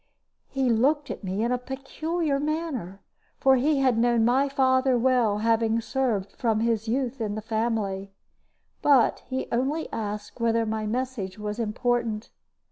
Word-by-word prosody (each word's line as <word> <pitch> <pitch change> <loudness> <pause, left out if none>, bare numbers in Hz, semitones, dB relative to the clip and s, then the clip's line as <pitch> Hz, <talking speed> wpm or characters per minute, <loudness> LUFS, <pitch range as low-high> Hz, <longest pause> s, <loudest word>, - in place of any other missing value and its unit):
He 270 -1 0
looked 280 +6 +2
at - - -7
me 195 +3 -2
in 235 - 0
a 250 - +1
peculiar 280 +4 -2
manner, 290 - -3 0.4
for 265 0 +5
he 290 +4 +2
had 255 -4 +3
known 235 -1 +3
my 265 +4 +3
father 260 -1 +3
well, 240 -4 +2
having 225 0 +2
served 230 -5 -1
from 225 -2 0
his 225 -1 0
youth 255 +1 -1
in 210 -2 -2
the - - -3
family; 220 -4 -2 0.7
but 275 -5 +4
he 260 +1 -2
only 275 +7 0
asked 210 +1 -5
whether 230 0 +2
my 215 0 -2
message 230 -5 -3
was 210 +1 -4
important. 230 0 -1
235 Hz, 150 wpm, -26 LUFS, 220-265 Hz, 0.7 s, for